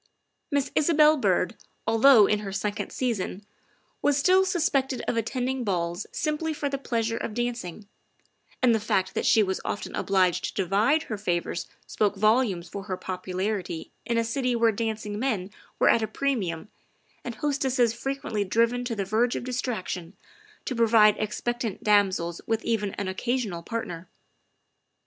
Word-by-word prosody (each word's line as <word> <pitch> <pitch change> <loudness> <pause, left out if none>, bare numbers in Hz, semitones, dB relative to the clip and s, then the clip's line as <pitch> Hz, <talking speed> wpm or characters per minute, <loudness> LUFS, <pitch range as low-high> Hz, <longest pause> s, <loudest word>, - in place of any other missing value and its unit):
Miss 285 -2 0
Isabel 305 0 +5
Byrd, 275 - +1 0.3
although 225 -1 +6
in 210 +1 +1
her 200 -2 -6
second 205 +1 -3
season, 210 -5 -2 0.6
was 290 -1 +3
still 370 +6 +4
suspected 280 -8 0
of - - 0
attending 250 +3 -1
balls 175 -4 -2
simply 310 +1 -2
for 290 - -2
the 275 -1 -3
pleasure 230 -3 -1
of 215 - -4
dancing, 235 -5 -4 0.8
and 245 -2 +6
the 220 - +2
fact 190 -3 0
that - - -1
she 220 - +5
was 190 -1 -2
often 205 - -4
obliged 185 -3 +1
to 195 - -1
divide 215 - +2
her 215 -3 -5
favors 175 -3 -2 0.2
spoke 205 -1 0
volumes 215 -4 +2
for 195 +3 -7
her 185 -3 -3
popularity 185 -1 -4
in 235 -1 -1
a 230 - +3
city 250 +2 -1
where 230 -1 +4
dancing 215 -1 -3
men 215 -7 -1 0.3
were - - +3
at 230 - +5
a 220 - 0
premium 210 -11 -2 0.5
and 240 -2 -5
hos 290 -2 -1
tesses 250 -4 +2
frequently 235 -4 -2
driven 230 +5 +1
to 240 -2 -2
the 200 -2 -2
verge 225 +5 +1
of - - -3
distraction 220 -8 -4 0.5
to 255 - -3
provide 225 -2 +5
expectant 225 0 -3
damsels 190 -5 +2
with 225 -1 -1
even 210 -4 -1
an 200 - -3
occasional 205 -2 -2
part 230 +6 -3
ner. 170 +1 -8
225 Hz, 160 wpm, -26 LUFS, 195-250 Hz, 0.8 s, although